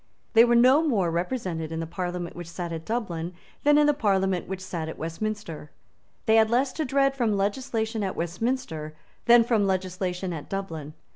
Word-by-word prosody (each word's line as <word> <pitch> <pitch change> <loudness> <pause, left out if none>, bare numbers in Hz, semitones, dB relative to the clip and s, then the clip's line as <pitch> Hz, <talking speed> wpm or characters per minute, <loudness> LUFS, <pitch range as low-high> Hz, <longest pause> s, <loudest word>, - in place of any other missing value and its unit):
They 225 0 +8
were 240 0 +4
no 255 +5 +6
more 210 - +1
represented 170 -3 -2
in 160 - -3
the 165 - -2
parliament 175 +1 -4
which 175 -1 -8
sate 170 0 -5
at 165 -1 -5
Dublin 180 -7 -3 0.3
than 295 0 +5
in 300 - +5
the 295 - +4
parliament 195 -7 +1
which 190 0 -4
sate 175 -4 -5
at - - -7
Westminster. 165 -2 -5 0.6
They 220 0 +5
had 220 -1 +5
less 255 +3 +1
to 315 - -2
dread 275 0 +2
from 230 -6 +1
legislation 220 +1 -1
at 190 - -2
Westminster 170 -4 -3 0.3
than 235 0 +7
from 225 -4 +2
legislation 185 -1 -2
at 155 -3 -7
Dublin. 160 -6 -5
190 Hz, 185 wpm, -26 LUFS, 170-235 Hz, 0.6 s, They